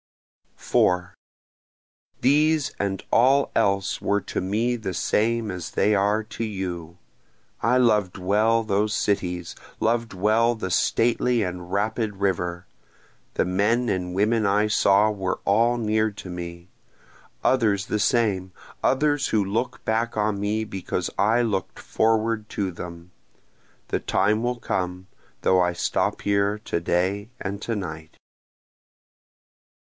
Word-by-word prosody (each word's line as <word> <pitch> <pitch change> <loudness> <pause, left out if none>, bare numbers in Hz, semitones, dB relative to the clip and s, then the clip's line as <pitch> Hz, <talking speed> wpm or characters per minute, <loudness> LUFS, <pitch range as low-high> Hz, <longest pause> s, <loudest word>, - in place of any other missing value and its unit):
4 90 +2 +1 1.1
These 150 +3 +3
and 95 -1 -2
all 135 +4 +4
else 100 -1 +1
were 100 0 +1
to 95 - -4
me 110 +6 0
the 110 -5 -4
same 110 +3 0
as 90 -3 -6
they 105 - +2
are 105 +2 +2
to 115 +1 -6
you, 90 -5 -5 0.6
I 120 +3 +3
loved 105 -7 +2
well 105 +5 +2
those 105 0 0
cities, 90 -4 -1 0.3
loved 115 0 0
well 110 +5 +2
the 95 -5 -4
stately 120 +4 +2
and 90 -1 -5
rapid 105 +1 -1
river, 90 -2 -1 0.7
The - - +2
men 105 +7 +1
and 90 -2 -2
women 110 +2 +2
I 105 +2 +3
saw 105 0 +4
were 95 -3 -2
all 115 +4 +3
near 110 -1 +1
to 100 -2 -10
me, 85 0 -7 0.7
Others 105 -6 +2
the 105 - -1
same 100 -5 +1 0.3
others 145 +1 +2
who 105 -2 +2
look 120 +6 -3
back 115 +1 0
on 105 -1 0
me 105 +2 -1
because 95 -3 -3
I 110 +4 +3
look'd 100 -6 -2
forward 110 -1 0
to 95 -2 -2
them, 85 0 -9 0.8
(The - - 0
time 105 +2 +1
will 120 0 -1
come, 90 -3 -3 0.3
though 95 - +3
I 90 0 +1
stop 85 - -1
here 100 +1 +1
to 105 - -2
day 95 +5 -1
and 100 +1 -4
to 115 - -2
night.) 80 -5 -7
105 Hz, 130 wpm, -24 LUFS, 95-115 Hz, 1.1 s, all